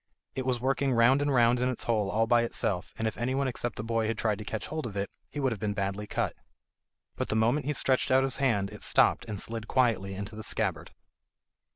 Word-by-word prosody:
It 130 Hz, -1 st, -4 dB
was 125 Hz, -2 st, +1 dB
working 135 Hz, +1 st, +1 dB
round 120 Hz, +4 st, +5 dB
and 145 Hz, 0 st, +1 dB
round 120 Hz, -1 st, +4 dB
in 125 Hz, +1 st, +1 dB
its 125 Hz, -, -3 dB
hole 110 Hz, -4 st, +1 dB
all 110 Hz, +3 st, +2 dB
by 120 Hz, +1 st, +4 dB
itself, 100 Hz, -5 st, -2 dB
and 110 Hz, -, -1 dB
if 110 Hz, -, -4 dB
anyone 130 Hz, +3 st, 0 dB
except 120 Hz, -2 st, -3 dB
the 105 Hz, -, -5 dB
boy 115 Hz, -1 st, 0 dB
had 115 Hz, 0 st, -1 dB
tried 110 Hz, -2 st, 0 dB
to -, -, -5 dB
catch 110 Hz, 0 st, -4 dB
hold 155 Hz, -4 st, -4 dB
of 100 Hz, -3 st, -7 dB
it, 100 Hz, 0 st, -2 dB, 0.2 s
he 145 Hz, -, -6 dB
would 135 Hz, -2 st, +1 dB
have 110 Hz, -, -4 dB
been 105 Hz, 0 st, -2 dB
badly 100 Hz, +1 st, -2 dB
cut. -, -, -1 dB, 0.8 s
But -, -, -3 dB
the -, -, 0 dB
moment 120 Hz, +7 st, +2 dB
he 150 Hz, -, +1 dB
stretched 130 Hz, -1 st, +1 dB
out 130 Hz, +1 st, +5 dB
his 135 Hz, 0 st, +1 dB
hand 105 Hz, -8 st, +1 dB
it -, -, -10 dB
stopped -, -, +3 dB
and 105 Hz, -2 st, -4 dB
slid 115 Hz, 0 st, -5 dB
quietly 110 Hz, -7 st, +1 dB
into 100 Hz, +2 st, -6 dB
the 110 Hz, -, -6 dB
scabbard. -, -, -2 dB
115 Hz, 240 wpm, -29 LUFS, 105-130 Hz, 0.8 s, round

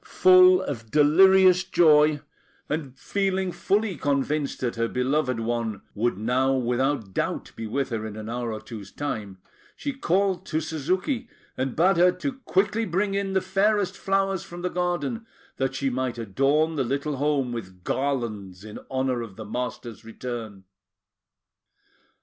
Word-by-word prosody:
Full 185 Hz, 0 st, +6 dB
of 115 Hz, -9 st, -5 dB
delirious 185 Hz, -, +6 dB
joy, 155 Hz, -5 st, +4 dB, 0.5 s
and 140 Hz, -4 st, -4 dB
feeling 190 Hz, +2 st, -1 dB
fully 200 Hz, 0 st, 0 dB
convinced 145 Hz, +1 st, -1 dB
that 125 Hz, -2 st, -1 dB
her 115 Hz, 0 st, 0 dB
beloved 130 Hz, 0 st, 0 dB
one 115 Hz, -3 st, -2 dB
would 115 Hz, -1 st, 0 dB
now 125 Hz, +5 st, +1 dB
without 125 Hz, -3 st, 0 dB
doubt -, -, -2 dB
be 115 Hz, -, -5 dB
with 135 Hz, +5 st, -1 dB
her 115 Hz, -3 st, -3 dB
in 105 Hz, -, -8 dB
an 110 Hz, 0 st, -7 dB
hour 120 Hz, 0 st, -3 dB
or 110 Hz, -, -5 dB
two's 110 Hz, -5 st, -9 dB
time, 105 Hz, -9 st, -5 dB, 0.4 s
she 285 Hz, -, -4 dB
called 190 Hz, -6 st, 0 dB
to 155 Hz, -, 0 dB
Suzuki, 185 Hz, -, -2 dB, 0.3 s
and 130 Hz, -1 st, -2 dB
bade 180 Hz, +3 st, +3 dB
her 180 Hz, +1 st, +6 dB
to 285 Hz, -, -3 dB
quickly 205 Hz, +4 st, +1 dB
bring 195 Hz, +1 st, 0 dB
in 195 Hz, -1 st, -1 dB
the 190 Hz, -, +2 dB
fairest 195 Hz, +1 st, +1 dB
flowers 195 Hz, -1 st, 0 dB
from 175 Hz, 0 st, -9 dB
the 180 Hz, -, -1 dB
garden, 180 Hz, +6 st, -2 dB, 0.3 s
that 135 Hz, 0 st, -1 dB
she 135 Hz, 0 st, -1 dB
might 130 Hz, -1 st, -2 dB
adorn 140 Hz, +9 st, +1 dB
the 135 Hz, -, +2 dB
little 140 Hz, +3 st, -2 dB
home 140 Hz, -3 st, 0 dB
with 95 Hz, -6 st, -8 dB
garlands 110 Hz, -8 st, -3 dB
in 110 Hz, -1 st, -9 dB
honour 130 Hz, -2 st, -1 dB
of 110 Hz, -5 st, -8 dB
the 110 Hz, -, -8 dB
master's 120 Hz, -1 st, -5 dB
return. 115 Hz, -3 st, -7 dB
140 Hz, 155 wpm, -25 LUFS, 120-185 Hz, 0.5 s, Full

